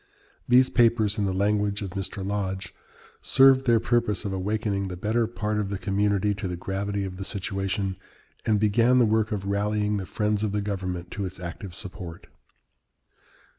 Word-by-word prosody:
These 125 Hz, +1 st, +5 dB
papers, 115 Hz, -3 st, +3 dB
in 100 Hz, -, +1 dB
the -, -, 0 dB
language 100 Hz, +1 st, 0 dB
of 95 Hz, -, -5 dB
Mr, 95 Hz, 0 st, -4 dB
Lodge, 95 Hz, -1 st, -3 dB, 0.5 s
"served 135 Hz, 0 st, +5 dB
their 115 Hz, -1 st, +5 dB
purpose 120 Hz, -3 st, 0 dB
of 100 Hz, -, -2 dB
awakening 100 Hz, +1 st, -1 dB
the 90 Hz, -1 st, -6 dB
better 110 Hz, +4 st, +1 dB
part 105 Hz, -2 st, -2 dB
of 100 Hz, -2 st, -2 dB
the 100 Hz, -, -2 dB
community 100 Hz, +1 st, +1 dB
to 100 Hz, -1 st, -4 dB
the 90 Hz, -1 st, -4 dB
gravity 100 Hz, +2 st, -2 dB
of 90 Hz, -1 st, -6 dB
the 95 Hz, -, -4 dB
situation, 95 Hz, -1 st, -2 dB, 0.5 s
and 105 Hz, -2 st, +2 dB
began 115 Hz, +4 st, +4 dB
the 125 Hz, -, +5 dB
work 110 Hz, +1 st, +1 dB
of 100 Hz, -2 st, -2 dB
rallying 105 Hz, +1 st, 0 dB
the 95 Hz, -2 st, -4 dB
friends 105 Hz, -1 st, 0 dB
of 105 Hz, -2 st, -1 dB
the 105 Hz, -, 0 dB
government 90 Hz, -3 st, -4 dB
to 100 Hz, -, -3 dB
its 95 Hz, 0 st, -6 dB
active 90 Hz, +1 st, -7 dB
support." 90 Hz, -3 st, -7 dB
100 Hz, 175 wpm, -26 LUFS, 95-105 Hz, 0.5 s, These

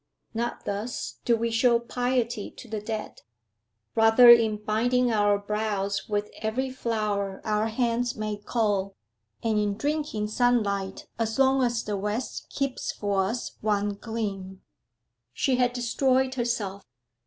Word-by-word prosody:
Not 235 Hz, +1 st, -3 dB
thus 205 Hz, +4 st, -4 dB
do 235 Hz, -, +4 dB
we 230 Hz, 0 st, -1 dB
show 235 Hz, +1 st, +4 dB
piety 240 Hz, -2 st, -1 dB
to -, -, -13 dB
the 215 Hz, -2 st, -4 dB
dead; 215 Hz, 0 st, -5 dB, 0.7 s
rather 225 Hz, +2 st, +8 dB
in 225 Hz, -3 st, +5 dB
binding 240 Hz, +4 st, +1 dB
our 205 Hz, -1 st, +3 dB
brows 200 Hz, -1 st, -2 dB
with 210 Hz, 0 st, -1 dB
every 250 Hz, +5 st, -1 dB
flower 210 Hz, -6 st, -2 dB
our 215 Hz, 0 st, +1 dB
hands 235 Hz, +1 st, 0 dB
may 215 Hz, -1 st, -3 dB
cull, 205 Hz, -4 st, 0 dB, 0.5 s
and 220 Hz, -2 st, +2 dB
in 205 Hz, -1 st, 0 dB
drinking 290 Hz, -6 st, -1 dB
sunlight 210 Hz, -5 st, 0 dB
as 225 Hz, -1 st, -1 dB
long 270 Hz, 0 st, +4 dB
as 240 Hz, -2 st, +1 dB
the 210 Hz, -1 st, -2 dB
west 210 Hz, +5 st, -3 dB
keeps 275 Hz, -2 st, -2 dB
for 200 Hz, -2 st, 0 dB
us 230 Hz, +5 st, -3 dB
one 205 Hz, -1 st, +1 dB
gleam. 200 Hz, -3 st, -5 dB, 0.7 s
She 260 Hz, -, +1 dB
had 250 Hz, -1 st, +3 dB
destroyed 260 Hz, +2 st, +1 dB
herself. 230 Hz, -6 st, -2 dB
220 Hz, 135 wpm, -26 LUFS, 205-245 Hz, 0.7 s, rather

